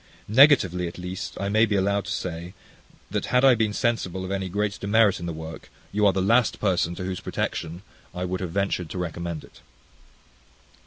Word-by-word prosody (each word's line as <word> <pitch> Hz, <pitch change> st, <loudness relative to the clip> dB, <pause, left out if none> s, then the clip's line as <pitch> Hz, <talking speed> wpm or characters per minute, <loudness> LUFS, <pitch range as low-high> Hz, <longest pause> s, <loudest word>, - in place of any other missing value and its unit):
Negatively, 110 Hz, -, +5 dB
at 85 Hz, -, -8 dB
least, 90 Hz, +3 st, -6 dB
I 100 Hz, -, -2 dB
may 110 Hz, +3 st, +3 dB
be 105 Hz, -, 0 dB
allowed 100 Hz, +1 st, +1 dB
to -, -, -5 dB
say, 90 Hz, +1 st, -5 dB, 0.6 s
that -, -, -2 dB
had 125 Hz, +1 st, +3 dB
I 135 Hz, -, +8 dB
been 110 Hz, -2 st, +1 dB
sensible 100 Hz, -5 st, -1 dB
of 95 Hz, -, -5 dB
any 95 Hz, -1 st, -2 dB
great 100 Hz, +2 st, -2 dB
demerit 105 Hz, 0 st, +3 dB
in 85 Hz, -, -5 dB
the -, -, -2 dB
work, 80 Hz, 0 st, -8 dB, 0.2 s
you 105 Hz, +1 st, +3 dB
are -, -, +5 dB
the 95 Hz, 0 st, -1 dB
last 115 Hz, +3 st, +3 dB
person 90 Hz, -4 st, +1 dB
to 95 Hz, -, -6 dB
whose 95 Hz, -1 st, -3 dB
protection 85 Hz, +3 st, -4 dB, 0.3 s
I 90 Hz, +1 st, -4 dB
would 90 Hz, 0 st, -3 dB
have 90 Hz, -, -3 dB
ventured 95 Hz, -2 st, -1 dB
to 90 Hz, -, -6 dB
recommend 85 Hz, -2 st, -4 dB
it. -, -, -17 dB
95 Hz, 200 wpm, -25 LUFS, 90-105 Hz, 0.6 s, I